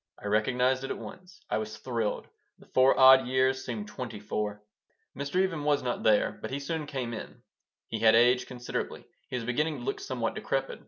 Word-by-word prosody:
I - - -12
recognized 125 +5 +1
it 135 - -4
at - - -3
once. 180 -1 -11
I - - 0
was 110 0 -6
thrilled. 115 -2 -2 0.3
The - - -18
four 130 +1 +4
odd 130 -1 +8
years 130 +1 +1
seemed 110 -4 -5
twenty 110 -1 -6
four. 105 0 -3 0.5
Mr. 140 +3 -5
Even 185 -6 0
was 145 -2 +2
not 125 -1 -2
there, 105 -1 +2
but - - -5
he 135 - -3
soon 150 +1 -4
came 130 -5 -4
in. - - -8 0.4
He 110 - -4
had 110 0 +6
aged 125 +2 +4
considerably. 125 -1 -5 0.2
He - - -4
was 120 -2 -3
beginning 150 +6 0
to - - -8
look 410 0 -2
somewhat 400 - -2
decrepit. - - -2
130 Hz, 200 wpm, -29 LUFS, 115-140 Hz, 0.5 s, odd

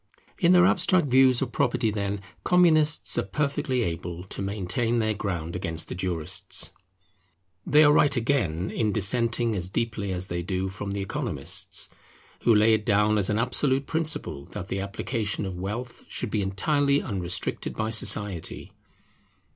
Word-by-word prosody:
In 175 -3 +4
their 180 -1 +6
abstract 180 -4 +3
views 130 0 +5
of 125 - -5
property, 110 -1 +1
then, 100 -1 -3 0.2
Communists 155 -6 +3
are - - +3
perfectly 140 +2 -1
able 85 -1 -4
to 95 - -7
maintain 105 +4 -1
their 110 -1 +1
ground 85 -5 -4
against 85 -3 -3
the - - -4
jurists. 90 -4 -3 1.0
They 150 +2 +6
are 145 - +6
right, 145 - +4
again, 110 - 0
in 110 -2 0
dissenting 115 +2 +2
as 90 -1 -1
deeply 105 -2 -2
as 90 0 -3
they 85 -2 -3
do 95 +2 -2
from 100 +1 -6
the 100 - -3
Economists, 95 - -4 0.6
who 115 - +6
lay 110 +1 +5
it 110 -1 +1
down 105 0 +3
as 95 - +3
an 105 - +1
absolute 130 +3 +1
principle 155 - -2
that 95 -2 -6
the 95 - -2
application 100 +1 -3
of 95 -2 -5
wealth 115 +6 -5
should 120 - -3
be 105 - 0
entirely 140 +9 +1
unrestricted 90 -9 -3
by 110 0 -2
society. 105 -5 -1
105 Hz, 155 wpm, -26 LUFS, 95-130 Hz, 1.0 s, their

